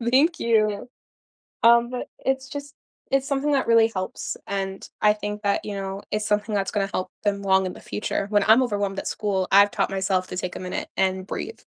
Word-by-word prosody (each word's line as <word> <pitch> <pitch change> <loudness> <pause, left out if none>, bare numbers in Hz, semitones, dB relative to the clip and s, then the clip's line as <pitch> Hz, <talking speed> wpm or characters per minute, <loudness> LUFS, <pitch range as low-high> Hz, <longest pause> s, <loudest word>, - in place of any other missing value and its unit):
Thank 310 +6 +3
you. 215 -1 +1 0.8
Um, 235 +1 +6
but, 250 - -4 0.2
it's 265 0 0
just 285 0 -7 0.4
it's 270 0 +2
something 285 +1 0
that 270 - +1
really 230 -1 +5
helps, 185 -1 -4
and 195 -1 -4
I 210 0 +5
think 210 0 -5
that, 200 -1 0
you 205 - -4
know, 195 0 -5
it's 210 0 -1
something 210 +1 0
that's 195 -1 0
gonna 195 -2 0
help 185 - -2
them 200 -1 0
long 190 -1 +3
in 180 - -3
the - - -12
future, 205 -1 -3
when 205 -1 +3
I'm 225 +4 +7
overwhelmed 205 -5 -1
at - - -5
school, 195 -3 -1
I've 200 +1 +7
taught - - 0
myself 190 -1 0
to 180 - -6
take 180 -1 -4
a - - -5
minute 180 0 -4
and 190 0 +1
breathe. - - -5
205 Hz, 210 wpm, -24 LUFS, 195-235 Hz, 0.8 s, I'm